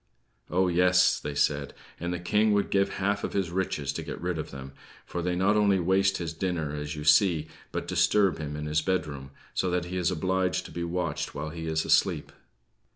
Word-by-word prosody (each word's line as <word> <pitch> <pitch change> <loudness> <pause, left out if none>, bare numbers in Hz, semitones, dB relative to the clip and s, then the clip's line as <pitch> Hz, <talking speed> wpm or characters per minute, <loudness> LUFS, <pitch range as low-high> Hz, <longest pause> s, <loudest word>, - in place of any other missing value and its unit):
"Oh, 95 +1 +2
yes!" 90 +1 +4
they 75 -1 -5
said, 75 0 0 0.2
"and 85 +1 -3
the 90 - -1
King 105 +5 +2
would 100 0 +1
give 100 0 +2
half 100 +1 0
of - - -3
his 95 -4 -1
riches 85 -6 -1
to - - -4
get - - -6
rid 90 -2 -2
of - - -5
them; 70 0 -9 0.3
for 85 - -4
they 90 +1 -1
not 95 +4 +3
only 100 -2 +3
waste 95 +2 +2
his 85 -3 -4
dinner, 80 -3 -2
as 75 +1 -4
you 75 - -6
see, 80 0 +4 0.2
but - - -4
disturb 100 -5 +3
him 75 -1 -4
in 75 0 -4
his 75 +1 +1
bedroom, 75 -7 -2 0.2
so 95 - 0
that 90 -1 0
he 90 +1 -4
is 90 -1 +1
obliged 95 +1 0
to - - -10
be 85 - -4
watched 85 -4 -3
while 75 +2 -4
he 80 0 -6
is 80 0 0
asleep." - - +2
90 Hz, 215 wpm, -28 LUFS, 75-95 Hz, 0.3 s, yes